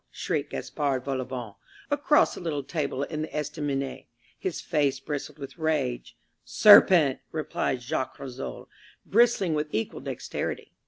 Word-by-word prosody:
shrieked -, -, -2 dB
Gaspard 135 Hz, -3 st, -2 dB
Volauvent 130 Hz, -5 st, -4 dB, 0.3 s
across 290 Hz, +1 st, +3 dB
the -, -, -8 dB
little 150 Hz, -5 st, -2 dB
table 140 Hz, -2 st, -2 dB
in 155 Hz, +1 st, -4 dB
the 155 Hz, -, -2 dB
estaminet. 145 Hz, -3 st, -3 dB, 0.3 s
His 185 Hz, -, -3 dB
face 145 Hz, -5 st, 0 dB
bristled 145 Hz, +2 st, -5 dB
with 140 Hz, -1 st, -9 dB
rage. 150 Hz, -6 st, -1 dB, 0.3 s
"Serpent!" 180 Hz, -9 st, +7 dB
replied 140 Hz, -5 st, -2 dB
Jacques 130 Hz, 0 st, -3 dB
Rissole, 135 Hz, -2 st, -7 dB, 0.4 s
bristling 220 Hz, -5 st, +3 dB
with 150 Hz, 0 st, -1 dB
equal 110 Hz, +1 st, -2 dB
dexterity. -, -, -4 dB
145 Hz, 125 wpm, -27 LUFS, 130-160 Hz, 0.4 s, Serpent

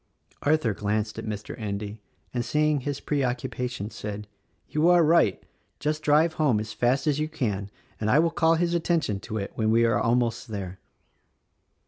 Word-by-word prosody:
Arthur 145 Hz, -7 st, +2 dB
glanced 105 Hz, +1 st, -2 dB
at -, -, -6 dB
Mr. 105 Hz, -1 st, -5 dB
Endy 105 Hz, 0 st, -4 dB, 0.3 s
and 120 Hz, -1 st, -1 dB
seeing 150 Hz, +4 st, +2 dB
his 140 Hz, +1 st, -3 dB
preoccupa 125 Hz, -3 st, -1 dB
tion 105 Hz, -3 st, -6 dB
said, 105 Hz, 0 st, -6 dB, 0.4 s
"You 155 Hz, +3 st, +2 dB
are 175 Hz, -1 st, +6 dB
right. 155 Hz, -, +3 dB, 0.4 s
Just 150 Hz, +1 st, -1 dB
drive 155 Hz, +2 st, +3 dB
home 130 Hz, -9 st, +3 dB
as 110 Hz, +1 st, -5 dB
fast 125 Hz, +5 st, +1 dB
as 150 Hz, -2 st, +1 dB
you 155 Hz, 0 st, -1 dB
can 105 Hz, -10 st, -2 dB, 0.3 s
and 110 Hz, -, -1 dB
I 130 Hz, -, +5 dB
will 165 Hz, +1 st, +3 dB
call 165 Hz, -1 st, +3 dB
his 170 Hz, +1 st, 0 dB
attention 165 Hz, -, 0 dB
to 110 Hz, +2 st, -5 dB
it 100 Hz, -1 st, -4 dB
when 110 Hz, -1 st, 0 dB
we 115 Hz, +1 st, +4 dB
are 115 Hz, -3 st, +2 dB
almost 120 Hz, +1 st, +1 dB
there." 95 Hz, -4 st, -6 dB
120 Hz, 175 wpm, -26 LUFS, 105-150 Hz, 0.4 s, are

